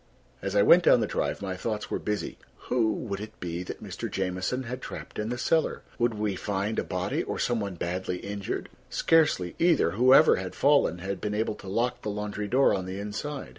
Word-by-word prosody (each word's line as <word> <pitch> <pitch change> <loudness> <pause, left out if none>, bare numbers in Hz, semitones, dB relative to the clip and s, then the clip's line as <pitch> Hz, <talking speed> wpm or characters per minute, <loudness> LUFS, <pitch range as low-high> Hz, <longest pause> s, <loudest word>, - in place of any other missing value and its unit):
As - - -3
I 100 - +5
went 175 - +7
down - - +7
the 110 - +1
drive, 100 - -2
my 95 -1 -3
thoughts 105 +3 -4
were - - -1
busy. 105 -1 -3 0.3
Who 115 -3 +2
would 100 -2 -4
it 105 +1 -9
be 85 0 -4
that 90 - -7
Mr. - - -5
Jamieson 95 +7 -2
had 125 +2 -6
trapped - - -7
in 105 +1 -2
the 125 - -2
cellar? 160 +5 +1 0.2
Would 120 -1 +2
we 105 -2 -1
find 100 +3 -2
a - - 0
body - - -2
or - - -4
some 120 -2 0
one 100 -3 -4
badly 90 +2 -3
injured? 100 +1 -4 0.2
Scarcely 150 - +2
either. 165 - +4
Whoever 130 - +6
had 95 0 -5
fallen 140 - +3
had 95 +2 -5
been 105 0 -2
able 110 0 0
to 100 - -12
lock 120 +5 -1
the 105 - -3
laundry 105 0 -3
door 130 +6 +4
on 95 -2 -2
the 95 +1 -5
inside. 130 +8 -5
105 Hz, 210 wpm, -27 LUFS, 95-125 Hz, 0.3 s, went